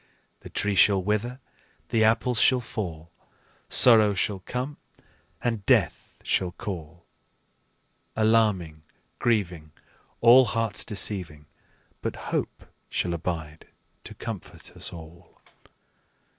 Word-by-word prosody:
The - - -12
tree 105 0 0
shall 95 +1 +5
wither, 105 +6 -2 0.5
the 110 -1 +2
apples 115 +2 +2
shall 130 -1 +4
fall, 85 -9 -6 0.6
Sorrow 110 -4 +6
shall 95 +1 -1
come, 130 +4 -4 0.7
and 115 -4 -1
death - - +1
shall 90 -2 -1
call, 85 -3 -8 1.1
Alarming, 105 -8 +1 0.4
grieving, 90 -9 -1 0.5
All 125 +2 +7
hearts 115 -2 +1
deceiving, 90 -8 -1 0.6
But - - -3 0.2
hope - - -3 0.2
shall 85 - -2
abide 80 -2 -5 0.4
to - - -9
comfort - - -8
us - - -7
all. 85 +1 -13
100 Hz, 105 wpm, -25 LUFS, 85-115 Hz, 1.1 s, All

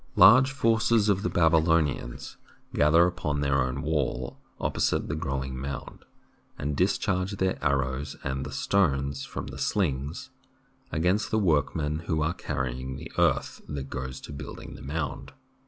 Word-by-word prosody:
Large 130 +6 +8
forces 115 -4 +3
of 100 -1 +2
the - - 0
Babylonians 80 -6 +1 0.4
gather 80 +3 +5
upon 75 -5 -1
their 70 -1 +2
own 65 +2 -2
wall 70 -5 -1 0.2
opposite - - 0
the - - -2
growing 65 -4 -3
mound 70 +2 -6 0.5
and 70 +1 -2
discharge 95 +2 +1
their 95 -4 -1
arrows 70 -1 0
and 65 0 -2
the - - -6
stones 70 -7 +1
from - - -6
the - - -8
slings 85 - -1 0.6
against 90 +7 +1
the 110 - +1
workmen 75 -4 +1
who 80 -4 +1
are 80 +2 0
carrying 65 -5 -3
the 70 - -8
earth - - +1
that 70 -2 -5
goes 65 0 -4
to - - -9
building 70 - -8
the - - -11
mound. 75 +3 -4
75 Hz, 145 wpm, -27 LUFS, 70-90 Hz, 0.6 s, Large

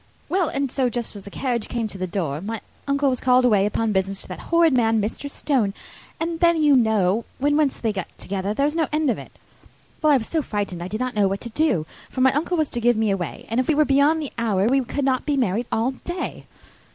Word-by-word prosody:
"Well, 365 -4 +1
and 275 -2 -2
so, 260 -2 +1
just 240 -2 -4
as 200 - -9
the - - -8
carriage 240 0 -2
came 235 -2 -2
to 200 - -8
the 185 - -2
door, 165 -5 -2
my 220 +3 -4 0.3
uncle 280 0 +2
was 255 -2 0
called 250 0 +4
away 205 -4 +4
upon 225 +1 0
business 195 0 -1
to - - -12
that 185 - -6
horrid 335 -3 +4
man 225 -3 +3
Mr. 220 +7 -3
Stone. 245 -9 0 0.4
And 330 0 -2
then, 340 -1 +4
you 295 -2 +5
know, 220 -3 +2
when 290 +2 +1
once 295 -3 +2
they 225 -2 -1
get 190 -3 -4
together, 195 +1 -3
there 275 +7 +1
is 300 +2 0
no 325 -2 +1
end 305 -3 +2
of - - -3
it. - - -12 0.7
Well, 305 -2 +4
I 280 - +6
was 225 - -4
so 320 +5 -1
frightened 205 - -3
I 175 - -4
did 215 +3 -4
not 255 0 -2
know 205 -3 +3
what 195 +1 -2
to 235 - -7
do, 225 - +1 0.2
for 260 - -3
my 260 0 +5
uncle 330 +5 0
was 310 -2 +1
to 240 - -2
give 240 0 +3
me 220 -2 +2
away; 185 -4 -4
and 230 +3 -1
if 255 - 0
we 315 - +3
were 305 +1 +4
beyond 290 +3 +3
the 285 - -7
hour 205 -4 +1
we 265 +3 +3
could 275 +3 -2
not 260 -1 +1
be 290 -2 0
married 235 -1 0
all 230 +4 +1
day. 350 +7 -6
245 Hz, 260 wpm, -23 LUFS, 210-285 Hz, 0.7 s, I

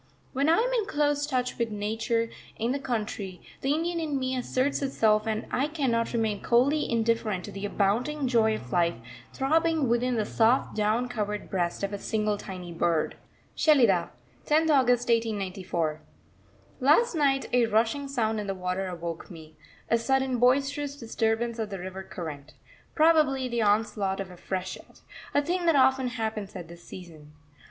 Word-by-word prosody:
When 280 +3 +1
I 330 - +5
am - - +1
in 445 -4 0
close 290 -4 +1
touch 250 -4 -2
with 235 -1 0
Nature 225 +2 -1 0.3
in 230 +2 0
the 280 - -1
country, 210 -7 -4 0.2
the 270 - 0
Indian 335 +2 -1
in 305 -4 -1
me 260 0 -1
asserts 255 +3 0
itself 220 -6 +2
and 220 -1 -1
I 275 +3 +1
cannot 260 -7 0
remain 220 -3 -1
coldly 275 +6 +2
indifferent 225 -5 0
to - - -8
the 195 +1 -4
abounding 245 +9 0
joy 225 -3 +3
of 125 -10 -9
life 170 +2 +2 0.4
throbbing 320 +1 +1
within 240 +1 +1
the 215 -2 0
soft 230 +5 +2
down 215 +3 +1
covered 210 -4 -4
breast 175 0 -1
of 200 +1 -2
a 200 - -4
single 215 -1 -1
tiny 180 -3 -7
bird. 165 -1 +1 0.4
SHELIDAH, 235 - +4 0.4
10th 315 +1 +3
August 245 -4 +3
1894. 190 -8 -1 0.8
Last 310 - +4
night 275 -4 +2
a 245 -2 +4
rushing 225 +6 +1
sound 225 -5 0
in 205 - -4
the 195 - -2
water 185 +1 -2
awoke 170 -2 -6
me 160 -3 -12 0.3
a 230 - +2
sudden 265 +1 +1
boisterous 280 +3 +2
disturbance 230 -1 -1
of 220 -2 -2
the 195 - -5
river 185 +1 -6
current 160 -6 -8 0.4
probably 305 -5 +4
the 235 -1 -1
onslaught 205 -2 +1
of 190 -2 -5
a - - -11
freshet: 185 +1 -6 0.3
a 285 - +4
thing 350 +2 -1
that 330 - +5
often 265 -1 +4
happens 220 -5 -4
at 175 -3 -7
this 170 0 -12
season. 160 -5 -12
230 Hz, 165 wpm, -27 LUFS, 195-270 Hz, 0.8 s, I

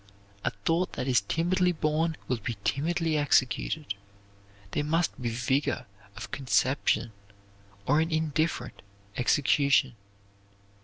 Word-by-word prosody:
A - - +2 0.2
thought 170 +3 +1
that 125 - -3
is 125 -4 +4
timidly 180 - +1
born 160 0 0
will 125 - 0
be 115 0 -4
timidly 160 +2 0
executed. 140 -1 +1 0.8
There - - 0
must 160 -1 0
be 120 - -1
vigor 125 +2 0 0.3
of 105 - -7
conception 130 -3 +1 0.7
or 150 +3 +3
an 160 - 0
indifferent 155 -4 -1 0.3
execution. 135 0 +3
145 Hz, 110 wpm, -28 LUFS, 125-160 Hz, 0.8 s, is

